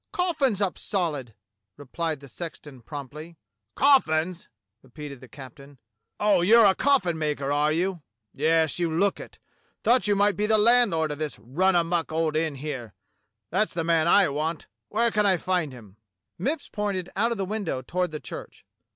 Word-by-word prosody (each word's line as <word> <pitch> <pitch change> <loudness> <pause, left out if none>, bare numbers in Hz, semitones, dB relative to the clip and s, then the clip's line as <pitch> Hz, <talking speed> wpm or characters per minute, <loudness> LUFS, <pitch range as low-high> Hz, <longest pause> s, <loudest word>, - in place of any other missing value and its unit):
" - - -57
Coffins 280 - 0
up 190 - -2
solid," 150 - -2 0.4
replied 150 +2 -4
the 140 - -12
sexton 145 -2 -9
promptly. 150 +6 -9 0.2
|( 105 0 -54
"Coffins!" 185 - +2 0.3
repeated 140 0 -10
the 130 - -12
captain. 140 +2 -13 0.4
"Oh, 205 -3 +3
you're 225 +5 +6
a 195 - +6
coffin 190 - +1
maker, 145 -3 -2
are 150 +1 +2
you.^ 175 +2 -1 0.3
Yes, 160 +2 +1
you 170 -2 0
look 195 +5 +1
it. - - -11 0.5
Thought 235 -4 +3
you 205 - +3
might 205 0 +3
be 210 +1 0
the 220 0 +4
landlord 210 -9 +4
of 145 - -6
this 155 -2 -3
run 165 - 0
amuck 170 -1 0
old 160 -1 0
inn 155 -2 0
here. 135 -6 -6 0.6
That's 210 +5 0
the 165 - -1
man 165 -1 +2
I 195 +2 +5
want. 155 +3 -3 0.3
\Miere 230 +2 +2
can 210 -1 +3
I 190 -2 +3
find 180 -5 -1
him.^" 110 -6 -14 0.5
Mipps 285 +4 -2
pointed 200 -4 -3
out 230 +4 +1
of 235 - -2
the 195 - -2
window 190 -10 -3
toward 180 +6 -1
the 155 -1 -6
church. - - -10
165 Hz, 175 wpm, -25 LUFS, 150-200 Hz, 0.6 s, you're